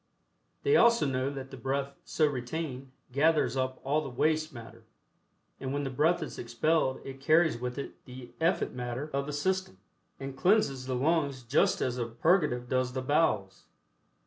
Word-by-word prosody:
They 425 +1 +4
also 235 - +5
know 135 -1 0
that 135 -1 -7
the 135 - -8
breath 135 +2 -2
so 155 - +2
retained 135 0 -4 0.2
gathers 150 +1 +3
up 130 0 -1
all 145 +3 +1
the 145 - -5
waste 155 +5 +1
matter, 115 -4 -11 0.8
and 130 - -4
when 145 +1 -1
the 135 - -3
breath 160 +5 +2
is - - -7
expelled 130 +3 +1
it 135 0 -8
carries 155 -3 +3
with 125 +1 -4
it 140 - -7
the 125 -1 -10
effete 170 +3 +1
matter 125 +4 -4
of 140 +1 -1
the - - -3
system, 185 - -1 0.4
and 135 0 -6
cleanses 140 -8 +2
the 130 - -1
lungs 140 -1 +1
just 125 +6 +2
as 125 -1 -1
a 120 - -1
purgative 125 0 +1
does 130 0 0
the 130 0 -3
bowels. 120 - +1
135 Hz, 170 wpm, -30 LUFS, 125-155 Hz, 0.8 s, also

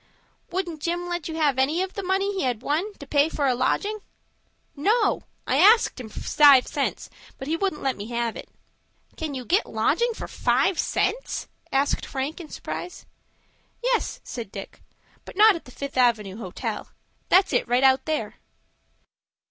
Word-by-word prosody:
"Wouldn't 350 -4 -3
Jim 345 +2 -2
let 350 -3 -3
you 320 - -5
have 290 -5 +2
any 305 +7 +2
of 380 - -6
the 400 - -4
money 390 +2 0
he 385 - -2
had 250 -3 -1
won 330 +9 0
to 285 - -11
pay 290 +2 +3
for 295 -3 -1
a 260 - +3
lodging?" 405 - 0 0.8
"No; 410 +12 +2 0.2
I - - +1
axed 440 - +5
him 235 -3 -7
for - - -8
five 280 -4 +6
cents, - - -2 0.3
but 265 - -7
he 320 - +1
wouldn't 380 -2 -2
let 270 -1 0
me 205 +1 -6
have 235 -1 -2
it." - - -9 0.7
"Can 310 -3 -4
you 255 -2 -5
get 375 - +2
lodging 470 -1 +1
for - - -6
five 380 - +1
cents?" - - -1 0.2
asked 275 +1 +1
Frank, 275 +6 -4
in 315 - -10
surprise. 360 - -7 0.8
"Yes," - - 0
said 230 -5 -7
Dick, 195 - -9 0.4
"but - - -12
not 430 -1 +7
at 335 - -8
the 250 - -13
Fifth 280 +1 -6
Avenue 220 -6 +2
Hotel. 190 -6 -5 0.4
That's 380 +1 +4
it - - +1
right 245 +2 +2
out 265 0 +4
there." 310 -1 -2
300 Hz, 175 wpm, -25 LUFS, 260-375 Hz, 0.8 s, not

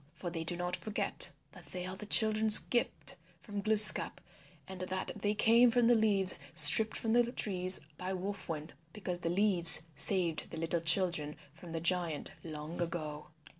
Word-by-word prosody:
For 175 - -10
they 165 -1 -8
do 175 +2 -2
not 180 0 -4
forget 215 -1 -2 0.2
that - - -18
they 180 -1 -10
are 185 0 -9
the 210 +2 -12
children's 215 0 +4
gift 240 - -4 0.2
from 205 -2 -10
Glooskap 215 +1 +4 0.5
and 190 -1 -12
that 185 +1 -7
they 210 +1 -5
came 235 +3 +1
from 240 0 -2
the 240 - +1
leaves 205 -6 -1 0.2
stripped 215 +10 +6
from 225 -1 -5
the 240 0 -1
trees 185 -5 0 0.2
by 185 +1 -8
Wolf 190 +1 -9
Wind 155 -1 -9 0.2
because 185 -4 -9
the 170 - -6
leaves 175 -3 +5
saved 170 +1 +2
the - - -11
little 165 +1 -5
children 165 -3 0 0.2
from 165 +1 -16
the 165 - -7
giant 170 -3 -3
long 155 +1 -10
ago. 155 -3 -8
185 Hz, 170 wpm, -29 LUFS, 165-210 Hz, 0.5 s, stripped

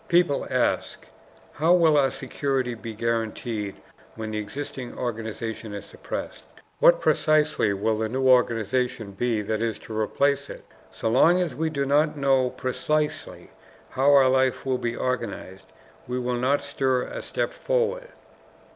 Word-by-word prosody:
People 170 -5 +2
ask, - - -1 0.5
"How 165 +4 +4
will 165 -3 +4
our 140 -2 +4
security 130 -1 -2
be 115 -1 -8
guaranteed 115 -2 -2 0.4
when 110 -1 -5
the 110 - -2
existing 130 +3 -6
organization 110 -2 -4
is 100 - -7
suppressed? - - -7 0.3
What - - +6
precisely 155 - +2
will 110 +2 0
the 110 0 -1
new 130 +2 0
organization 120 -2 +2
be 110 +1 -1
that 110 +1 -2
is 115 -1 -1
to 110 - -9
replace 140 +6 0
it? - - -10 0.2
So - - -4
long 160 +10 +5
as 175 -3 -1
we 160 +1 -1
do 140 -3 -1
not 150 +2 +2
know 135 -2 +3
precisely 150 +5 -2 0.4
how 135 +2 +3
our 140 -2 +6
life 130 0 +2
will 130 -1 0
be 120 0 -2
organized, 95 -7 -4 0.4
we 125 +1 -2
will 125 -1 -1
not 135 +3 +1
stir 130 -3 0
a - - -6
step - - -2
forward." - - -1
130 Hz, 150 wpm, -25 LUFS, 115-145 Hz, 0.5 s, What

